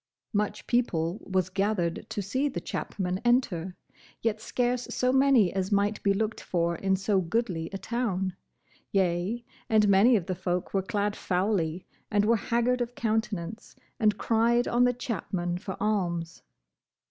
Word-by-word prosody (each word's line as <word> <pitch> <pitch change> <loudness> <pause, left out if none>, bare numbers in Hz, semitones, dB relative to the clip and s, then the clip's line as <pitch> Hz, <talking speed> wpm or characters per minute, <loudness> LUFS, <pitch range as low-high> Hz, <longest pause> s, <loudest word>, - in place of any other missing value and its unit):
Much 210 0 -1
people 185 -7 0
was 185 -1 +1
gathered 195 -3 -1
to 205 - -3
see 260 +9 0
the - - -4
chapmen 185 -2 -3
enter, 190 -8 +1 0.5
yet 220 -1 0
scarce 245 +1 -1
so 250 0 +1
many 265 -8 +4
as 190 +1 -1
might 205 +1 +1
be 200 - +3
looked 215 +2 -1
for 170 -1 0
in 190 +2 +1
so 195 0 +1
goodly 175 -3 -1
a 195 - -3
town; 195 -3 -2 0.6
yea, 190 +5 0 0.2
and 215 -1 +4
many 200 +5 +6
of 190 -6 0
the 185 - -2
folk 180 0 -2
were 195 - +2
clad 205 +2 -1
foully, 180 -2 0 0.2
and 205 -1 +2
were 230 +2 +4
haggard 235 +3 +1
of 245 0 -3
countenance, 220 -3 -2 0.2
and 210 -3 +3
cried 235 +2 +2
on 245 +1 +3
the 245 - +3
chapmen 190 -8 -3
for 190 +1 -5
alms. 175 -6 -1
205 Hz, 155 wpm, -28 LUFS, 185-230 Hz, 0.6 s, many